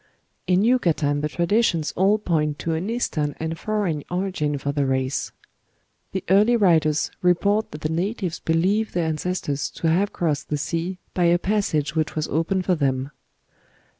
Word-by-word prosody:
"In 185 +2 +3
Yucatan 165 - +2
the 150 - -1
traditions 175 -1 +1
all 195 +3 +3
point 155 -7 0
to 165 - -2
an 170 +6 -2
Eastern 155 -11 -1
and 160 0 -3
foreign 200 -9 -1
origin 180 -5 -1
for 140 +1 -2
the 140 -1 0
race. 130 0 -1 0.8
The 190 - -3
early 210 +5 +5
writers 160 -7 +3
report 200 +5 +2
that 150 - -9
the 155 - -1
natives 180 +1 -2
believe 190 +7 +1
their 175 -2 0
ancestors 155 -2 -2
to 165 - -2
have 195 +5 +2
crossed 150 -4 -2
the 150 - 0
sea 170 +5 -3 0.2
by 180 - +1
a 170 +1 +5
passage 175 -6 0
which 155 -1 -1
was 155 0 -1
opened 180 +4 0
for 185 - +3
them." 135 -3 -1
170 Hz, 165 wpm, -23 LUFS, 150-190 Hz, 0.8 s, early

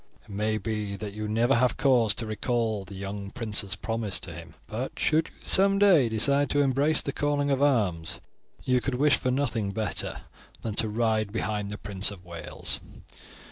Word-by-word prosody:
It 120 - -23
may 105 +2 0
be 105 -2 -3
that 100 0 -6
you 105 0 -4
may 105 - -3
never 120 +3 +4
have 125 -1 +2
cause 120 -6 +4
to 115 - -1
recall 110 -1 -1
the 95 +1 -10
young 100 +1 -5
prince's 105 -4 -1
promise 115 +1 -2
to 90 - -6
him; 85 +1 -11
but 120 +5 -5
should 160 +1 +2
you - - -17
some 195 +1 +5
day 180 - +5
decide 140 +6 +2
to 145 - +2
embrace 140 +3 +2
the 140 - -2
calling 145 0 0
of 135 0 +1
arms, 100 - +1 0.4
you 125 -1 +2
could 135 0 -2
wish 145 +3 +3
for 130 - -2
nothing 125 -6 0
better 110 +1 -3 0.4
than 110 - -2
to 110 +1 +2
ride 110 -1 0
behind 105 -2 -2
the 105 - -5
Prince 100 -1 -1
of 95 -3 -11
Wales. 85 -2 -3
110 Hz, 190 wpm, -27 LUFS, 100-135 Hz, 0.4 s, some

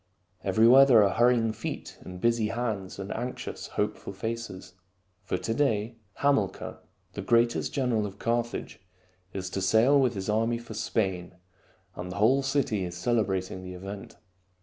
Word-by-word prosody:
Everywhere 120 +5 +7
there 115 -5 +7
are 100 -2 +2
hurrying 120 -1 +3
feet 110 - -6
and 90 -1 -9
busy 115 0 +2
hands 110 -5 -3
and 95 0 -6
anxious, 125 +2 -5
hopeful - - -2
faces. 110 -3 -5 0.5
For - - -2
to 115 - -2
day 115 -4 0 0.3
Hamilcar, 135 -10 0 0.3
the - - -5
greatest 120 0 +2
general 120 -6 0
of 100 0 -10
Carthage, 120 +1 -2 0.5
is 95 -1 -4
to 95 - -2
sail 110 +9 +4
with 125 -3 +1
his 95 -1 -4
army 115 +2 +1
for 120 -1 -9
Spain, 95 -5 -2 0.6
and 90 0 -6
the - - -6
whole 120 +7 +4
city 135 -7 0
is 90 -1 -5
celebrating 95 -4 -1
the 90 0 -8
event. 100 +2 -8
110 Hz, 150 wpm, -28 LUFS, 95-120 Hz, 0.6 s, Everywhere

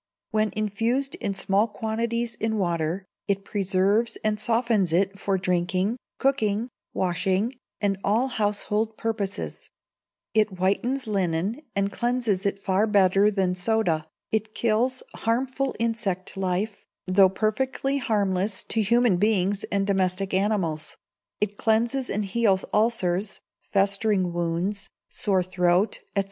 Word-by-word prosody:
When 215 0 +2
infused 225 +6 0
in 200 -2 -1
small 195 +3 +2
quantities 230 +2 -2
in 220 0 -2
water, 175 0 -1 0.2
it 195 -1 -1
preserves 200 +3 +1
and 215 -1 +1
softens 225 -4 +1
it 195 +3 +1
for 195 -1 0
drinking, 185 +4 0 0.2
cooking, 230 -4 +1 0.2
washing, 190 +5 0 0.3
and 200 -2 0
all 225 +6 +2
household 215 -1 -1
purposes; 215 -3 -3 0.6
it 215 -1 +3
whitens 200 +8 0
linen 195 - -1
and 200 0 +1
cleanses 235 -5 0
it 200 - -1
far 195 +2 +1
better 200 0 +4
than 190 -3 +1
soda, 180 -4 0 0.2
it 220 0 -1
kills 235 +3 +1
harmful 260 +4 -1
insect 225 -5 -2
life, 195 +2 -2 0.2
though 190 +1 +5
perfectly 265 +7 -1
harmless 200 -4 0
to 225 - +2
human 235 -1 +3
beings 200 -1 +1
and 200 -1 0
domestic 190 -1 0
animals; 190 -6 0 0.4
it 205 -1 -1
cleanses 235 +4 +1
and 210 0 -1
heals 195 -1 +2
ulcers, 210 -3 +1 0.2
festering 195 -2 +1
wounds, 175 +4 -2 0.2
sore 190 -3 0
throat, 180 +2 +1 0.2
&c. - - +5
205 Hz, 125 wpm, -25 LUFS, 190-225 Hz, 0.6 s, though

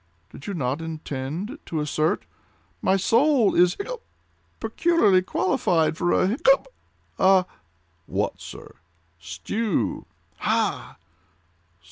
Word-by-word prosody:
"Did 140 - -11
you 200 - -3
not 135 0 -2
intend 160 - -5
to 160 - -2
assert—" 155 +2 0 0.6
"My 190 - +3
soul 235 +3 +3
is—hiccup!—peculiarly 335 - 0
qualified 175 -3 +1
for—hiccup!—a—" 195 - +1 0.6
"What, - - -2
sir?" - - -11 0.4
"Stew." 85 - -2 0.3
"Ha!" - - -1
185 Hz, 75 wpm, -24 LUFS, 155-230 Hz, 0.6 s, My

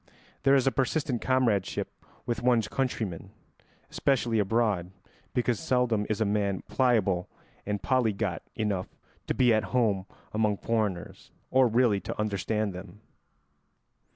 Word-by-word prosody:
There 135 0 +5
is 135 - +3
a 135 - +3
persistent 135 -2 0
comradeship 120 -7 0 0.2
with 120 - -2
one's 120 -3 +3
countrymen, 110 -10 -3 0.6
especially 120 -5 +1
abroad, 105 -4 +1 0.5
because 120 -2 +1
seldom 120 -5 +1
is 110 - -1
a 110 - +2
man 100 -2 0
pliable 105 -9 +1 0.4
and 105 0 -1
polyglot 110 - 0
enough 100 -4 -1 0.4
to - - -1
be 125 -3 +4
at 110 0 +1
home 100 -6 +1 0.3
among 105 -1 +1
foreigners, 105 -6 -2 0.2
or 130 -1 +5
really 115 -3 +3
to - - -6
understand 105 0 -1
them. 95 +3 -10
110 Hz, 125 wpm, -28 LUFS, 100-125 Hz, 0.6 s, There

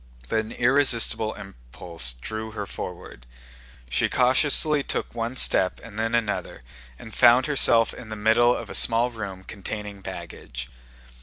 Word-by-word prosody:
But 110 - +1
an 110 +1 -5
irresistible 120 -4 +2
impulse 60 -3 -3
drew 110 - -6
her 105 -2 -5
forward. 85 -10 -9 0.6
She - - +1
cautiously 145 +4 +2
took - - -4
one 115 +2 -4
step 95 -7 +3
and 110 -2 -9
then 115 +1 0
another, 105 - -3 0.3
and 110 - -12
found 125 +2 +5
herself 120 -6 +3
in 110 - -11
the 110 - -5
middle 115 +3 +3
of - - -7
a - - -6
small 120 +1 +3
room 100 -5 -7
containing 100 0 -7
baggage. 60 -7 -8
110 Hz, 145 wpm, -24 LUFS, 95-120 Hz, 0.6 s, found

